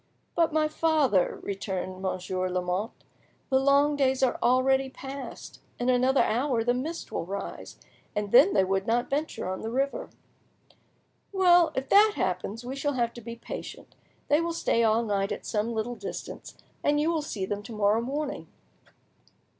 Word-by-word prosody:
"But, 330 -1 +2
my 310 0 +2
father," 305 - +2
returned 190 -2 -4
Monsieur 185 0 -2
de 185 - -5
Lamotte, 180 +5 -2 0.5
"the 265 - +5
long 280 +2 +4
days 265 -2 +1
are 250 - +2
already 265 +2 +3
past. 270 +1 -8 0.2
In 245 +1 0
another 255 +2 +4
hour 245 0 +1
the 245 +1 +2
mist 310 +7 -4
will - - -2
rise, 195 +3 -7 0.4
and 205 -1 -2
then 280 +11 +7
they - - +5
would 190 +1 -1
not 240 +3 0
venture 295 -7 -2
on 185 0 -4
the 220 - -4
river." 270 +4 -1 1.2
"Well, 355 -4 +5
if 265 +1 -2
that 420 +1 +6
happens, 190 +5 -2
we 260 +2 -4
shall 290 +1 -1
have 235 -2 0
to 240 - -10
be 235 +1 -7
patient; 235 - -8 0.3
they 295 +2 +3
will 335 0 -2
stay 235 -7 +1
all 225 +1 +3
night 200 -2 -1
at - - -5
some 215 +2 -1
little 225 +2 -2
distance, - - -8 0.3
and 295 0 +2
you 315 +3 +2
will 325 -2 0
see 210 -10 -4
them 205 +1 -3
to 210 - -11
morrow 210 +1 +2
morning." 280 +4 -4
245 Hz, 170 wpm, -27 LUFS, 205-285 Hz, 1.2 s, then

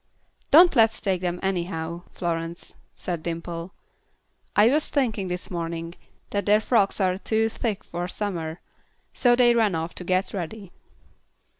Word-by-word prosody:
"Don't 340 +2 +7
let's 225 -2 +4
take 190 -3 -1
them 175 -1 -2
anyhow, 170 -3 -2
Florence," 170 -1 -4 0.2
said 175 -3 -4
Dimple. 170 +1 -5 0.8
"I 210 +2 +6
was 300 +5 +2
thinking 225 -9 0
this 180 +1 -5
morning 165 -1 -4 0.4
that 200 -1 -1
their 210 +1 +6
frocks 215 -3 +2
are 185 -1 +1
too 220 +2 +1
thick 215 -2 -3
for 175 +1 -4
summer." 175 -4 -4 0.5
So 245 -1 +4
they 240 -1 +5
ran 220 -6 +2
off 165 +1 -3
to - - -5
get 185 +2 0
ready. 195 +1 -6
185 Hz, 145 wpm, -25 LUFS, 170-220 Hz, 0.8 s, Don't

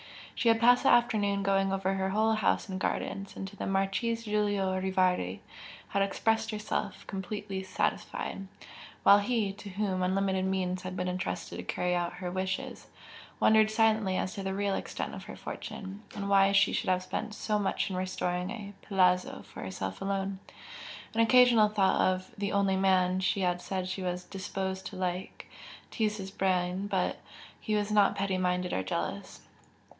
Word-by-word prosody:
She 240 - -1
had 225 0 +4
passed 245 +2 +6
the - - +3
afternoon 205 -4 +3
going 195 0 +2
over 195 0 0
her 190 0 -1
whole 220 +3 +2
house 215 0 +1
and 190 -1 -4
gardens, 195 +1 -3
and 195 - -5
to 200 - -11
the - - -4
Marchese 195 +4 0
Giulio 205 -3 0
Rivardi 185 - +1 0.5
had 200 - 0
expressed 220 +3 +1
herself 210 -2 -3
completely 195 0 -4
satisfied, 190 +1 -3 0.6
while 200 - +8
he, 205 -2 0
to 200 0 -10
whom 190 -1 -1
unlimited 190 0 +1
means 185 -1 -1
had 185 0 -6
been 180 - -1
entrusted 180 0 -3
to - - -5
carry 180 0 -1
out 175 0 -1
her 180 0 -5
wishes, 185 0 -3 0.5
wondered 220 0 +5
silently 215 -3 +2
as 185 - -2
to 200 - -5
the 190 0 -3
real 200 0 0
extent - - -4
of - - -8
her - - -8
fortune, 195 +1 -7
and 200 -1 -3
why 195 0 +5
she 200 - +4
should - - -1
have 185 0 +2
spent 210 +3 -4
so 210 -1 -1
much 195 0 -1
in - - -3
restoring 180 -1 -2
a 205 -3 -7
"palazzo" 180 -2 +2
for - - -11
herself 190 - -5
alone. 195 0 -2 0.7
An 225 - -2
occasional 230 -2 +6
thought 200 -2 +2
of 185 0 0
"the 200 0 -2
only 200 -1 +2
man" 185 -1 +3
she 190 +1 0
had 180 -1 0
said 185 -1 -3
she 190 +1 -4
was 180 0 -2
"disposed" 190 0 -4
to - - -9
like, 185 0 -4 0.5
teased 215 -1 0
his 195 -1 -6
brain; 185 0 0
but 190 -3 0 0.4
he 215 - -1
was 210 0 0
not 205 -1 +4
petty 195 -1 -1
minded 180 0 0
or - - 0
jealous. 95 - -4
195 Hz, 175 wpm, -30 LUFS, 185-205 Hz, 0.7 s, while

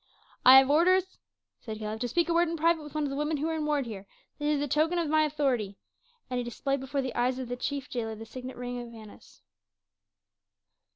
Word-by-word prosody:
"I 260 +1 +10
have 265 +1 +6
orders," 370 +4 +3 0.4
said 220 -2 -7
Caleb, 215 0 -5
"to 245 - -1
speak 340 +9 +1
a 340 - +1
word 340 0 +3
in 335 - -3
private 330 +1 +2
with 300 0 -11
one 305 - 0
of 285 - -2
the - - -3
women 300 +2 -1
who 300 +3 -1
are - - -1
in 305 -1 -2
ward 295 -3 +1
here; 200 -4 -8 0.3
this 295 - -2
is - - -1
the 290 - -1
token 315 +5 +1
of 335 -2 0
my 310 0 +4
authority," 260 -10 -1 0.5
and 250 -1 -2
he - - -2
displayed 275 +4 -2
before 270 +1 -2
the 260 - -4
eyes 250 +1 0
of 255 -2 -5
the 245 - -2
chief 275 +1 -3
jailer 225 -3 -4
the 225 +1 -9
signet 255 +3 -8
ring 245 0 -4
of 240 -1 -9
Annas. 220 -2 -14
275 Hz, 235 wpm, -29 LUFS, 245-305 Hz, 0.5 s, I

